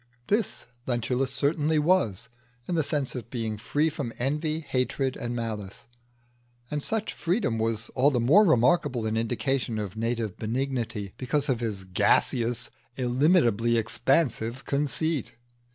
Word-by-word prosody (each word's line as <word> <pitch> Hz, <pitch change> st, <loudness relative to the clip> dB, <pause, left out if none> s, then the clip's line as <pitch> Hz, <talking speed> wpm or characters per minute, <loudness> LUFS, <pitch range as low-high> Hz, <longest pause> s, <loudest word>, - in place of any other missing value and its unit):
This 210 Hz, -1 st, 0 dB, 0.2 s
Lentulus 125 Hz, +2 st, 0 dB
certainly 150 Hz, +3 st, +1 dB
was, 150 Hz, -, +2 dB, 0.4 s
in -, -, -2 dB
the 165 Hz, -, +3 dB
sense 145 Hz, -3 st, -1 dB
of 120 Hz, -3 st, -7 dB
being 115 Hz, -3 st, -3 dB
free 150 Hz, +7 st, +1 dB
from 145 Hz, -6 st, -3 dB
envy, 150 Hz, +5 st, -1 dB
hatred, 130 Hz, -1 st, -1 dB
and 120 Hz, 0 st, -4 dB
malice; 110 Hz, -4 st, -5 dB, 0.9 s
and 150 Hz, 0 st, -1 dB
such 220 Hz, +7 st, -1 dB
freedom 170 Hz, -, 0 dB
was 115 Hz, 0 st, -1 dB
all 135 Hz, +2 st, +3 dB
the 130 Hz, -4 st, 0 dB
more 150 Hz, -, +6 dB
remarkable 130 Hz, -, +3 dB
an 110 Hz, 0 st, -1 dB
indication 120 Hz, +1 st, -1 dB
of 105 Hz, -2 st, -4 dB
native 115 Hz, -2 st, -2 dB
benignity, 115 Hz, -4 st, -2 dB
because 140 Hz, +3 st, -1 dB
of 125 Hz, -4 st, +1 dB
his 105 Hz, -5 st, -3 dB
gaseous, 115 Hz, +6 st, +1 dB, 0.3 s
illimitably 120 Hz, -, +3 dB
expansive 120 Hz, +1 st, 0 dB
conceit. 145 Hz, +1 st, -1 dB
125 Hz, 135 wpm, -27 LUFS, 115-150 Hz, 0.9 s, more